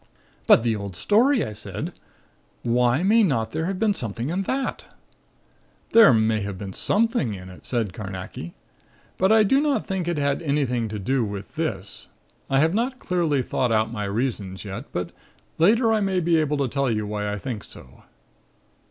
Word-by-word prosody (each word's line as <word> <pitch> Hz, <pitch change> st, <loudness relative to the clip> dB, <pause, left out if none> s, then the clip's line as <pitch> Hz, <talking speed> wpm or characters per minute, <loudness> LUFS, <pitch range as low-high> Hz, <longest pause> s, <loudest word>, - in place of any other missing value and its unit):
"But -, -, +7 dB
the 115 Hz, -2 st, +1 dB
old 100 Hz, -3 st, -6 dB
story!" 235 Hz, -, +3 dB
I 105 Hz, -, -6 dB
said. 105 Hz, -, -6 dB, 0.7 s
"Why 120 Hz, +5 st, +2 dB
may 220 Hz, +4 st, +5 dB
not 115 Hz, -, +1 dB
there 160 Hz, +7 st, -2 dB
have 190 Hz, 0 st, -2 dB
been 215 Hz, +1 st, +2 dB
something 120 Hz, -, -4 dB
in 185 Hz, +3 st, 0 dB
that?" 270 Hz, 0 st, -2 dB, 1.1 s
"There 225 Hz, -2 st, +8 dB
may 110 Hz, -2 st, +2 dB
have 100 Hz, -1 st, -4 dB
been 95 Hz, 0 st, -7 dB
something 215 Hz, -, +1 dB
in 90 Hz, 0 st, -10 dB
it," 90 Hz, -, -13 dB
said 115 Hz, -7 st, -1 dB
Carnacki. 95 Hz, -4 st, -7 dB, 0.6 s
"But 190 Hz, +2 st, +3 dB
I 220 Hz, 0 st, +6 dB
do 270 Hz, +7 st, +3 dB
not 295 Hz, -2 st, 0 dB
think 190 Hz, -3 st, -3 dB
it 175 Hz, -2 st, -1 dB
had 140 Hz, +1 st, 0 dB
anything 135 Hz, -7 st, 0 dB
to 105 Hz, -, -4 dB
do 125 Hz, +6 st, 0 dB
with 100 Hz, -2 st, -6 dB
this. -, -, -4 dB, 0.4 s
I 135 Hz, -, +2 dB
have 160 Hz, +2 st, +2 dB
not 245 Hz, +5 st, -1 dB
clearly 165 Hz, -, 0 dB
thought 125 Hz, 0 st, -1 dB
out 110 Hz, 0 st, +2 dB
my 105 Hz, -3 st, -3 dB
reasons, 100 Hz, -3 st, -3 dB
yet; 95 Hz, -1 st, -6 dB
but 90 Hz, -1 st, -3 dB, 0.5 s
later 225 Hz, +6 st, +4 dB
I 220 Hz, -, +2 dB
may 190 Hz, -2 st, +1 dB
be 170 Hz, -1 st, +2 dB
able 150 Hz, -1 st, +1 dB
to 140 Hz, -2 st, 0 dB
tell 140 Hz, +1 st, 0 dB
you 105 Hz, -2 st, -1 dB
why 105 Hz, 0 st, -3 dB
I 105 Hz, -, -3 dB
think 115 Hz, -2 st, -5 dB
so." 65 Hz, -1 st, -13 dB
130 Hz, 185 wpm, -24 LUFS, -, 1.1 s, There